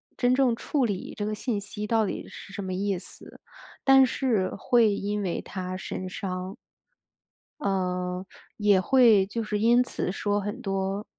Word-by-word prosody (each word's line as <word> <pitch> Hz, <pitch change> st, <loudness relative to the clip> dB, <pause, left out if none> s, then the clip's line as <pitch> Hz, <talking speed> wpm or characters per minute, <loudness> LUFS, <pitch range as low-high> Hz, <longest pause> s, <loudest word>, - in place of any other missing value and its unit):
真 245 Hz, 0 st, +2 dB
正 255 Hz, -4 st, +3 dB
处 270 Hz, +1 st, 0 dB
理 200 Hz, -4 st, -4 dB
这 205 Hz, -, -2 dB
个 215 Hz, -, -2 dB
信 215 Hz, -1 st, -2 dB
息 210 Hz, +1 st, -6 dB
到 225 Hz, -1 st, +2 dB
底 -, -, -4 dB
是 195 Hz, -, -11 dB
什 -, -, -4 dB
么 185 Hz, -1 st, -4 dB
意 195 Hz, -1 st, -1 dB
思， -, -, -12 dB, 0.4 s
但 270 Hz, -1 st, +7 dB
是 230 Hz, -7 st, 0 dB
会 225 Hz, -1 st, +3 dB
因 205 Hz, +1 st, -2 dB
为 175 Hz, -, -2 dB
它 185 Hz, -2 st, -5 dB
神 185 Hz, 0 st, -5 dB
伤。 185 Hz, +1 st, -5 dB, 1.1 s
呃， 180 Hz, -1 st, -1 dB, 0.3 s
也 205 Hz, -3 st, +4 dB
会 230 Hz, -3 st, +5 dB
就 230 Hz, +3 st, -3 dB
是 210 Hz, -1 st, -2 dB
因 240 Hz, +3 st, +5 dB
此 180 Hz, -, -3 dB
说 205 Hz, +1 st, 0 dB
很 210 Hz, +6 st, -5 dB
多 195 Hz, 0 st, -2 dB
205 Hz, 175 characters per minute, -27 LUFS, 190-230 Hz, 1.1 s, 但